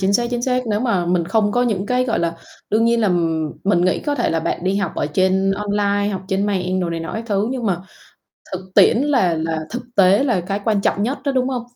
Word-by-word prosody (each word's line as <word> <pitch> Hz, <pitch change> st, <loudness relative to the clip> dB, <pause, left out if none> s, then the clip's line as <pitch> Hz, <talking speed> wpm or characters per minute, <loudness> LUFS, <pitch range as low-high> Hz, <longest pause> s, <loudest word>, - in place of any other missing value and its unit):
chính 195 Hz, +1 st, +1 dB
xác 240 Hz, +4 st, +2 dB
chính 240 Hz, -1 st, -2 dB
xác. 250 Hz, -1 st, 0 dB
Nếu 210 Hz, -1 st, 0 dB
mà 195 Hz, -8 st, 0 dB
mình 175 Hz, -1 st, +1 dB
không 205 Hz, +3 st, +1 dB
có 245 Hz, -, +2 dB
những 205 Hz, -5 st, -1 dB
cái, 250 Hz, +2 st, +1 dB
gọi 235 Hz, -3 st, 0 dB
là 170 Hz, 0 st, -1 dB, 0.3 s
đương 220 Hz, +2 st, +3 dB
nhiên 235 Hz, 0 st, +2 dB
là, 215 Hz, -, +2 dB
ừm, 165 Hz, -3 st, 0 dB
mình 185 Hz, -3 st, +3 dB
nghĩ 185 Hz, -, +1 dB
có 290 Hz, -1 st, -1 dB
thể 240 Hz, -, 0 dB
là 165 Hz, -, 0 dB
bạn 170 Hz, +2 st, -3 dB
đi 190 Hz, +1 st, +1 dB
học 200 Hz, -5 st, -1 dB
ở -, -, -1 dB
trên 190 Hz, +4 st, +1 dB
online, 205 Hz, 0 st, 0 dB
học 190 Hz, -1 st, -4 dB
trên 195 Hz, +1 st, 0 dB
mạng 185 Hz, -2 st, -1 dB
đồ 175 Hz, -2 st, -2 dB
này 165 Hz, 0 st, -3 dB
nọ 165 Hz, -, -6 dB
các 220 Hz, -, -4 dB
thứ, 205 Hz, 0 st, 0 dB
nhưng 255 Hz, -3 st, -3 dB
mà 180 Hz, -3 st, -1 dB, 0.7 s
thực 185 Hz, 0 st, -7 dB
tiễn -, -, +6 dB
là 255 Hz, -, +2 dB
là 160 Hz, 0 st, -2 dB
thực 245 Hz, -, -4 dB
tế 195 Hz, +5 st, +5 dB
là 235 Hz, -9 st, +1 dB
cái 195 Hz, +4 st, -3 dB
quan 215 Hz, -3 st, +2 dB
trọng 200 Hz, -, 0 dB
nhất 255 Hz, +6 st, -1 dB
đó, 280 Hz, -, 0 dB
đúng 255 Hz, -1 st, +1 dB
hông? 250 Hz, -2 st, -2 dB
200 Hz, 265 wpm, -20 LUFS, 180-235 Hz, 0.7 s, tiễn